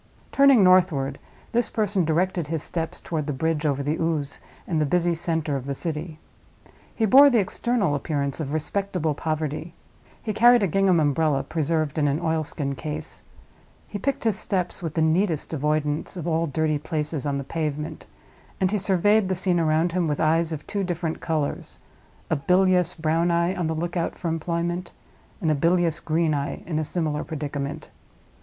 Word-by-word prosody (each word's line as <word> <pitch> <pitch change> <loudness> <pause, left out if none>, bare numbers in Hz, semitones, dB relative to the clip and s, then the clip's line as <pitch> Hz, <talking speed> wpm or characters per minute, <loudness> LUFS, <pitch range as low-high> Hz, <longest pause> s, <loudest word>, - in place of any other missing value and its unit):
Turning 275 -6 +6
northward, 170 -7 +3 0.3
this 240 0 +1
person 205 -4 0
directed 170 0 0
his 160 -1 -2
steps 165 -1 -3
toward 155 -3 -3
the - - -1
bridge 155 +2 -1
over 140 -1 0
the 150 +3 -1
Ouse 160 -3 -1 0.3
and 160 -4 0
the - - +4
busy 175 +2 +2
center 160 -3 -1
of 135 0 -4
the 140 - -2
city. 160 +1 -4 0.8
He 225 - +1
bore 275 +6 +8
the 245 - +3
external 210 -3 0
appearance 140 -1 -2
of 145 -3 -3
respectable 165 0 -1
poverty; 155 +2 -3 0.4
he 215 - -3
carried 240 +1 +6
a - - +3
gingham 190 0 +3
umbrella, 145 -1 +1
preserved 155 0 -1
in 145 - +2
an 145 +2 0
oilskin 155 -4 -1
case; 150 +3 -5 0.7
he 205 - -6
picked 275 +6 -2
his 220 -4 +1
steps, 185 -1 -2
with 165 -3 -4
the 160 - +2
neatest 160 0 +1
avoidance 150 +2 -1
of 175 - -5
all 165 0 +1
dirty 155 +1 0
places 150 -2 -2
on 140 -1 -1
the 140 - -3
pavement; 150 +1 -4 0.5
and 185 -1 +1
he 210 - +1
surveyed 200 +2 +3
the 185 - +1
scene 180 -1 +2
around 160 +1 +2
him 175 -1 0
with 150 -1 -1
eyes 165 +1 +2
of 155 -2 -5
two 200 -1 -2
different 175 -3 -3
colors—a 155 0 -4
bilious 180 +3 +3
brown 165 +1 +1
eye 170 +1 +2
on 180 -4 -2
the 160 - -1
lookout 170 +1 -2
for 170 - -3
employment, 170 +2 -2 0.5
and 160 - +2
a - - +4
bilious 170 +2 +2
green 160 0 0
eye 140 -1 -3
in 155 -2 -2
a - - 0
similar 155 -2 -2
predicament. 145 -2 -5
160 Hz, 175 wpm, -24 LUFS, 150-180 Hz, 0.8 s, bore